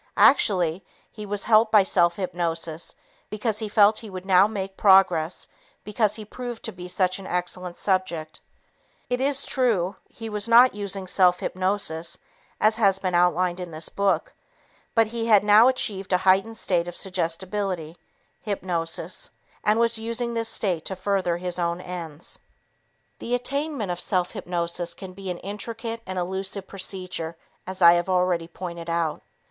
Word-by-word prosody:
Actually, 185 Hz, -, +4 dB, 0.3 s
he 210 Hz, -2 st, -8 dB
was 205 Hz, 0 st, -3 dB
helped 220 Hz, 0 st, +4 dB
by 210 Hz, -2 st, +7 dB
self 175 Hz, -2 st, +2 dB
hypnosis 170 Hz, -3 st, -3 dB, 0.3 s
because 215 Hz, 0 st, -2 dB
he 215 Hz, -2 st, -4 dB
felt 210 Hz, 0 st, +5 dB
he 220 Hz, -, -10 dB
would 185 Hz, -1 st, -8 dB
now 190 Hz, +1 st, +5 dB
make 195 Hz, -3 st, -5 dB
progress 190 Hz, -5 st, +4 dB, 0.4 s
because 210 Hz, 0 st, 0 dB
he 215 Hz, -1 st, -8 dB
proved 240 Hz, +1 st, -7 dB
to -, -, -4 dB
be 180 Hz, 0 st, -9 dB
such 185 Hz, +1 st, 0 dB
an 190 Hz, -, -9 dB
excellent 180 Hz, 0 st, -3 dB
subject. 180 Hz, -5 st, -1 dB, 0.7 s
It 245 Hz, +1 st, 0 dB
is 280 Hz, 0 st, +1 dB
true, 210 Hz, -8 st, +1 dB
he 225 Hz, -, -8 dB
was 210 Hz, -1 st, -2 dB
not 245 Hz, +2 st, +7 dB
using 200 Hz, -2 st, -4 dB
self 180 Hz, -1 st, +3 dB
hypnosis 185 Hz, -3 st, -1 dB, 0.4 s
as 215 Hz, +1 st, +3 dB
has 200 Hz, -4 st, +3 dB
been 185 Hz, -2 st, -2 dB
outlined 180 Hz, +1 st, +2 dB
in 180 Hz, -1 st, -6 dB
this 155 Hz, 0 st, -5 dB
book, 195 Hz, -5 st, 0 dB, 0.6 s
but 225 Hz, -1 st, +5 dB
he 230 Hz, +1 st, -4 dB
had 210 Hz, -3 st, +6 dB
now 210 Hz, +3 st, +7 dB
achieved 205 Hz, -7 st, -1 dB
a 180 Hz, -, +5 dB
heightened 195 Hz, +4 st, +3 dB
state 175 Hz, -5 st, 0 dB
of 175 Hz, -, -4 dB
suggestibility 180 Hz, -1 st, -2 dB, 0.5 s
(hypnosis) 180 Hz, -, -2 dB, 0.3 s
and 210 Hz, +2 st, +3 dB
was 230 Hz, -1 st, +2 dB
using 230 Hz, +1 st, -2 dB
this 230 Hz, -1 st, -1 dB
state 180 Hz, -8 st, 0 dB
to 190 Hz, -, -3 dB
further 185 Hz, -2 st, 0 dB
his 180 Hz, 0 st, -3 dB
own 170 Hz, 0 st, -1 dB
ends. 170 Hz, -4 st, -7 dB, 0.8 s
The 245 Hz, -, -1 dB
attainment 275 Hz, -, -2 dB
of 175 Hz, -, -4 dB
self 180 Hz, -2 st, 0 dB
hypnosis 170 Hz, 0 st, -3 dB
can 190 Hz, -1 st, -9 dB
be 195 Hz, 0 st, -7 dB
an 180 Hz, -, -3 dB
intricate 225 Hz, +4 st, -6 dB
and 185 Hz, 0 st, -5 dB
elusive 190 Hz, +2 st, -3 dB
procedure 185 Hz, -4 st, -5 dB, 0.3 s
as 185 Hz, -1 st, -3 dB
I 170 Hz, 0 st, +9 dB
have 175 Hz, +2 st, 0 dB
already 180 Hz, -2 st, +1 dB
pointed 170 Hz, -1 st, -7 dB
out. 165 Hz, -2 st, -1 dB
190 Hz, 160 wpm, -24 LUFS, 175-210 Hz, 0.8 s, I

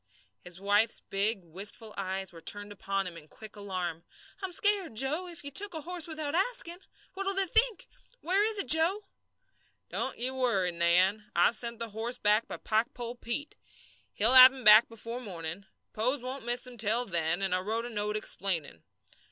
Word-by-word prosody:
His 180 Hz, 0 st, -9 dB
wife's 205 Hz, +3 st, +1 dB
big, 200 Hz, 0 st, -2 dB
wistful 200 Hz, +6 st, -6 dB
eyes 190 Hz, -1 st, -4 dB
were 165 Hz, -, -13 dB
turned 205 Hz, +4 st, -2 dB
upon 195 Hz, -1 st, -4 dB
him 180 Hz, -2 st, -8 dB
in 155 Hz, -2 st, -14 dB
quick 215 Hz, +6 st, -14 dB
alarm. 180 Hz, -5 st, -5 dB, 0.4 s
"I'm 380 Hz, -1 st, -5 dB
scared, 395 Hz, -, 0 dB
Joe, 295 Hz, +10 st, 0 dB
if 340 Hz, -4 st, -7 dB
you 285 Hz, -, -8 dB
took 395 Hz, +5 st, 0 dB
a 315 Hz, -, -3 dB
horse 345 Hz, +1 st, 0 dB
without 310 Hz, -2 st, -2 dB
asking. 365 Hz, -2 st, +1 dB, 0.3 s
What'll 390 Hz, +1 st, +3 dB
they 390 Hz, 0 st, +8 dB
think? 450 Hz, +4 st, +1 dB, 0.3 s
Where 380 Hz, +5 st, +1 dB
is 435 Hz, 0 st, +2 dB
it, 395 Hz, -, +2 dB
Joe?" 335 Hz, +7 st, +6 dB, 0.9 s
"Don't -, -, -4 dB
ye 250 Hz, +2 st, -3 dB
worry, 235 Hz, -9 st, 0 dB
Nan. 180 Hz, +5 st, +1 dB
I've 175 Hz, +7 st, +3 dB
sent 235 Hz, +1 st, -2 dB
the 230 Hz, 0 st, -5 dB
horse 225 Hz, +4 st, -3 dB
back 210 Hz, +2 st, +1 dB
by -, -, -7 dB
Pikepole 235 Hz, +2 st, -3 dB
Pete. 285 Hz, +6 st, -6 dB, 0.6 s
He'll 225 Hz, +5 st, +5 dB
have 255 Hz, 0 st, +11 dB
him 265 Hz, -1 st, -11 dB
back 215 Hz, +2 st, +7 dB
before 230 Hz, +2 st, -7 dB
morning 180 Hz, -3 st, -7 dB, 0.3 s
Pose 250 Hz, +4 st, -1 dB
won't 255 Hz, -1 st, -5 dB
miss 240 Hz, +1 st, -2 dB
him 250 Hz, -2 st, -9 dB
till 225 Hz, +3 st, +1 dB
then 170 Hz, -1 st, -2 dB
and 190 Hz, -1 st, -1 dB
I 185 Hz, -, +2 dB
wrote 220 Hz, +5 st, -2 dB
a -, -, -6 dB
note 210 Hz, 0 st, -2 dB
explaining. 175 Hz, -, -2 dB
225 Hz, 185 wpm, -28 LUFS, 195-290 Hz, 0.9 s, have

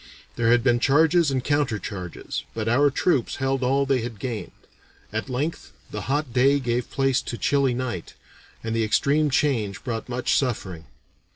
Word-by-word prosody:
There 115 Hz, -1 st, +1 dB
had 120 Hz, 0 st, +4 dB
been 120 Hz, -2 st, +3 dB
charges 160 Hz, +4 st, +4 dB
and 130 Hz, -2 st, -1 dB
counter 145 Hz, -6 st, +1 dB
charges, 90 Hz, -3 st, -6 dB
but -, -, -3 dB
our 140 Hz, +6 st, +4 dB
troops 140 Hz, -2 st, +1 dB
held 135 Hz, 0 st, -1 dB
all 135 Hz, +2 st, +2 dB
they 135 Hz, -2 st, +1 dB
had 115 Hz, -1 st, -6 dB
gained. 115 Hz, 0 st, -4 dB, 0.6 s
At 110 Hz, +5 st, -3 dB
length 145 Hz, +6 st, -3 dB, 0.2 s
the -, -, -4 dB
hot 145 Hz, -3 st, -1 dB
day 135 Hz, +3 st, +4 dB
gave 120 Hz, -2 st, -1 dB
place 135 Hz, -1 st, +1 dB
to 120 Hz, -, -5 dB
chilly 135 Hz, -2 st, +2 dB
night, 120 Hz, -9 st, -4 dB, 0.5 s
and 115 Hz, 0 st, -2 dB
the 115 Hz, -, +1 dB
extreme 140 Hz, +8 st, +2 dB
change 125 Hz, -9 st, 0 dB
brought 115 Hz, -1 st, -4 dB
much 125 Hz, 0 st, 0 dB
suffering. 95 Hz, -, -2 dB
125 Hz, 170 wpm, -24 LUFS, 115-140 Hz, 0.6 s, had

